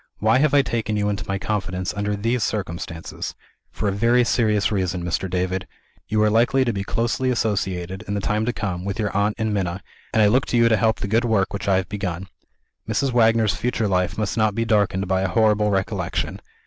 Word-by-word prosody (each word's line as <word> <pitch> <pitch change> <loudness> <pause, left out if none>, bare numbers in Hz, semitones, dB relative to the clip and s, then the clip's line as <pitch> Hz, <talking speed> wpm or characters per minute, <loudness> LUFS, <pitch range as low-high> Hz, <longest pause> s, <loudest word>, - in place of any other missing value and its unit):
Why 110 +4 +3
have 145 0 +3
I 140 - +6
taken 110 -4 -2
you 105 0 +1
into 100 -1 -3
my 95 - -1
confidence, 95 -3 -2
under 105 0 -1
these 115 +4 -1
circumstances? 85 -6 -4 0.3
For 105 - -3
a - - +2
very 120 +5 +3
serious 105 -4 +1
reason, 90 -3 -1
Mr. 85 +2 -2
David. 90 +1 -2 0.4
You 110 0 +2
are 105 - +4
likely 120 +4 +3
to 120 - 0
be 100 -1 -3
closely 120 +5 -1
associated, 95 -5 -1
in 100 - -2
the - - 0
time 105 +2 0
to - - +2
come, 95 -5 -4
with 100 0 -3
your 105 -3 -2
aunt 105 +1 +1
and 110 -2 -1
Minna 95 -2 -2 0.3
and 110 - +3
I - - +6
look 125 +6 +2
to 120 - +1
you 115 0 +5
to 110 - +4
help 110 +2 +1
the - - -2
good 115 +4 +2
work 105 -5 +1
which 100 - -4
I 100 - +4
have 95 -1 0
begun. 95 -2 -4 0.6
Mrs. 135 -1 +1
Wagner's 115 -3 +4
future 115 +2 -1
life 90 -2 0
must 105 +1 -2
not 110 -2 +2
be 115 0 0
darkened 100 -3 +1
by 95 0 +1
a 95 - +1
horrible 105 +1 +3
recollection. 95 -2 -2
105 Hz, 220 wpm, -22 LUFS, 95-115 Hz, 0.6 s, I